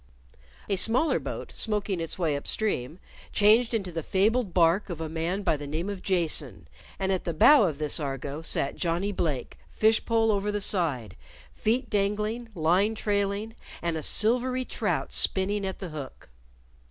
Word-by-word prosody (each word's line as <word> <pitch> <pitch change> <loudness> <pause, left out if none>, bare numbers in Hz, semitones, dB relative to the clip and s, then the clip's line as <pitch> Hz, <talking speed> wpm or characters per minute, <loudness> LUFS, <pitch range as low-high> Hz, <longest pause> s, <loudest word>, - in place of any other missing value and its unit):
A 195 - 0
smaller 230 - +2
boat, - - -6
smoking 205 -4 0
its 165 - -4
way 165 -5 0
up 140 - -6
stream, 165 - -1 0.3
changed 220 +3 +4
into 200 -6 -2
the 165 -1 -3
fabled 205 +5 +1
bark 175 +4 +3
of 170 -3 -5
a 160 - -3
man 165 +5 -2
by 160 - +2
the 145 0 -7
name 165 +7 -3
of 195 -2 -7
Jason, 150 - -1 0.3
and 190 0 -1
at 185 - -1
the 170 - -3
bow 280 - +7
of 155 -4 -4
this 150 0 -2
Argo 140 +1 -4
sat 140 -3 -1
Johnnie 175 +4 -1
Blake, 155 -9 -3
fish 220 +1 +2
pole 225 -1 +2
over 205 0 0
the 205 - -1
side, 150 - -1 0.4
feet 235 +4 0
dangling, 210 +3 -1
line 180 +7 +2
trailing, 205 +1 -1 0.3
and 170 -1 -2
a 160 - -3
silvery 250 - +2
trout 195 -8 -2
spinning 195 +1 +1
at 190 - -4
the 185 - -6
hook. 145 - -9
190 Hz, 170 wpm, -27 LUFS, 160-210 Hz, 0.4 s, bow